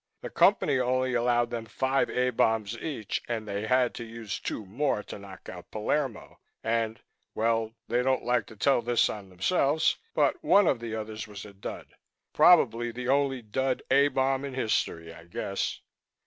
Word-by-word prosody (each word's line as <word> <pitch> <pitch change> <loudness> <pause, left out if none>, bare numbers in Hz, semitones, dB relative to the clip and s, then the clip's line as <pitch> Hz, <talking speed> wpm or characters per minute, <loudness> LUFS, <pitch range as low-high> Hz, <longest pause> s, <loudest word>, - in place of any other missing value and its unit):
The - - -6
Company 130 - +3
only 130 +1 +1
allowed 120 0 +2
them 115 -1 -4
five 135 +3 0
A 125 0 +1
bombs 110 -2 +1
each, 120 -6 -4
and 110 -2 -3
they 100 +2 -3
had 125 0 +3
to 120 - -6
use 115 -3 -6
two 110 - -4
more 110 +2 -1
to - - -9
knock 95 -1 -12
out 90 -2 -9
Palermo. 120 +3 -2 0.2
And 115 0 0 0.4
well, 115 0 0
they 120 +1 +1
don't 130 +1 +1
like 120 -4 +1
to 110 - -12
tell 125 +5 +3
this 120 0 +2
on 100 -3 -8
themselves, 140 - +1 0.2
but 365 - +2
one 200 0 +5
of 130 - +2
the 115 -1 -5
others 110 0 -5
was 105 -1 -9
a 105 - -12
dud. 100 - -8 0.4
Probably 120 +1 +5
the 125 +2 -5
only 135 -2 +1
dud 130 +5 -1
A 140 +1 +6
bomb 135 0 0
in 140 -2 -5
history, 85 -9 -1
I 85 0 -14
guess." 95 +3 -3
120 Hz, 175 wpm, -28 LUFS, 110-130 Hz, 0.4 s, A